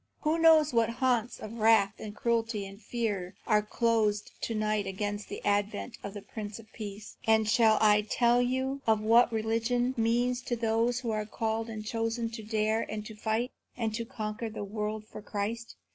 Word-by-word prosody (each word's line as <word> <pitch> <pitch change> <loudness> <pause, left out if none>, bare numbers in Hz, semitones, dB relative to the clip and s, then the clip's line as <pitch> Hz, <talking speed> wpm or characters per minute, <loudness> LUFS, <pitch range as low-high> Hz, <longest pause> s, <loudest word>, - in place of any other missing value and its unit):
who 315 +2 +1
knows 315 -3 +6
what 230 -1 +3
haunts 245 -1 0
of 220 +2 -7
wrath 215 -2 +5
and 210 -1 -7
cruelty 230 -3 0
and 195 +2 -11
fear 205 -7 -3
are 215 -2 +4
closed 215 -1 +1
to 230 - -2
night 215 -1 0
against 205 +2 -3
the - - -7
advent 205 - 0
of 200 +1 -7
the 205 - -7
Prince 210 -2 -6
of 225 - -12
Peace? 210 -1 -8
And 220 -1 +4
shall 220 -1 +5
I 210 -1 +5
tell 235 +3 +3
you 260 +2 -1
what 225 +2 +5
religion 230 +3 0
means 240 +2 +1
to 245 - -2
those 230 +2 +1
who 235 -3 -2
are 215 -1 -2
called 225 +1 -2
and 215 -1 -6
chosen 225 +1 -2
to 225 - -6
dare 220 +1 0
and 215 0 -4
to 220 - -8
fight, 220 +3 -1 0.3
and 225 -3 -1
to 230 +1 -2
conquer 220 0 -4
the 215 - -6
world 210 +1 -4
for 215 - -10
Christ? 215 +3 -4
220 Hz, 185 wpm, -30 LUFS, 210-235 Hz, 0.3 s, knows